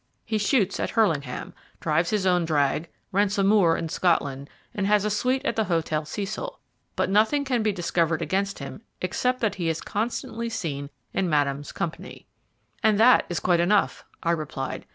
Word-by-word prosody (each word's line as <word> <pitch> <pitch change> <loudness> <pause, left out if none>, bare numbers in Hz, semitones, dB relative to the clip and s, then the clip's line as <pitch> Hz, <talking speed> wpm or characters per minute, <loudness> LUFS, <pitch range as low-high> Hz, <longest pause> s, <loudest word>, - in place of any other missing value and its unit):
He 220 -1 -1
shoots 205 -2 +1
at - - -1
Hurlingham, 155 - 0 0.3
drives 165 +2 +1
his 210 -3 0
own 180 -2 +3
drag, 155 0 +1 0.2
rents 200 +1 +1
a 195 - +3
moor 195 -5 +4
in 165 - -3
Scotland, 145 -5 0 0.2
and 195 -1 -1
has 210 0 +3
a 210 - 0
suite 255 +6 0
at 235 - 0
the 220 - +1
Hotel 160 -3 0
Cecil; 210 - -5 0.4
but - - +1
nothing 220 +9 +3
can 250 -3 +1
be 215 -1 +2
discovered 170 -3 0
against 200 +1 -1
him - - -8 0.2
except 250 +8 -1
that 220 -3 +1
he 165 - +1
is 160 0 -1
constantly 230 +2 -3
seen 145 -10 -4 0.2
in 190 -2 0
Madame's 145 -2 0
company." 165 - -5 0.6
"And 215 -1 +3
that 250 +3 +6
is 175 - -1
quite 175 -2 +2
enough," 195 +4 +2 0.2
I 170 - +2
replied. 150 -5 -4
190 Hz, 175 wpm, -25 LUFS, 160-215 Hz, 0.6 s, that